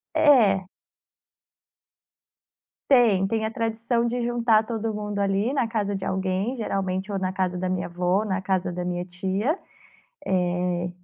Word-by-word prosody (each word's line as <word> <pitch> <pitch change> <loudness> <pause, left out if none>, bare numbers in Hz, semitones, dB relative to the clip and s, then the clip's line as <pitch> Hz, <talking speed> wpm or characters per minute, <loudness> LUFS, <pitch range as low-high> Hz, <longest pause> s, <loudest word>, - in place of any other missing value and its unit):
É. 225 - +5 2.2
Tem. 225 -8 +5
Tem 220 +1 -1
a 220 - -2
tradição 230 +1 -1
de 240 +1 -1
juntar 235 -2 +3
todo 225 -1 -3
mundo 210 -1 -4
ali 200 +5 +1
na 255 -5 +1
casa 205 -3 -1
de 190 - -4
alguém, 190 +5 -1
geralmente 195 -2 -2
ou 195 - -1
na 185 0 -1
casa 185 -1 -1
da 185 0 -2
minha 185 -1 -1
vó, 180 +4 0
na 190 -2 -1
casa 185 -1 -1
da 180 - -3
minha 175 0 -3
tia, 190 - -1 0.7
eh, 180 -1 0
195 Hz, 145 wpm, -25 LUFS, 185-225 Hz, 2.2 s, É